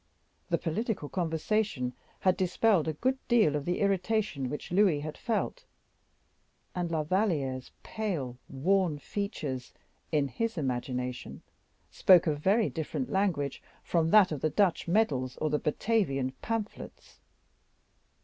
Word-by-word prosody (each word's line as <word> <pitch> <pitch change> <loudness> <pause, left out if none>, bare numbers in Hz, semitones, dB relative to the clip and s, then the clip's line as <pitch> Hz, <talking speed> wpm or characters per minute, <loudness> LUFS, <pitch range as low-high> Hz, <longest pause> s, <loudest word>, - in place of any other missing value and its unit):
The - - +2
political 185 -2 -2
conversation 165 - -1 0.3
had 185 -1 +3
dispelled 185 -1 +2
a 160 - 0
good 260 - 0
deal 220 -11 +4
of 145 -1 -2
the 175 - -1
irritation 195 - 0
which 150 - -6
Louis 180 -6 +3
had 155 +1 -5
felt, 240 - -2 1.1
and 175 -1 -2
La 160 -2 0
Valliere's 150 - 0
pale, 155 - -3
worn 170 +3 +1
features, 145 - -4 0.4
in 150 -3 +2
his 225 - -3
imagination, 125 -2 -3 0.5
spoke 185 -2 +6
a 155 - +2
very 195 +9 +2
different 170 - -4
language 185 -8 0 0.2
from 165 -2 +1
that 200 -1 +6
of 150 -4 -3
the 155 - +2
Dutch 180 +3 +1
medals, 145 - +1
or 155 - -1
the 150 - +1
Batavian 150 - 0
pamphlets. 225 -2 -5
170 Hz, 130 wpm, -30 LUFS, 145-205 Hz, 1.1 s, spoke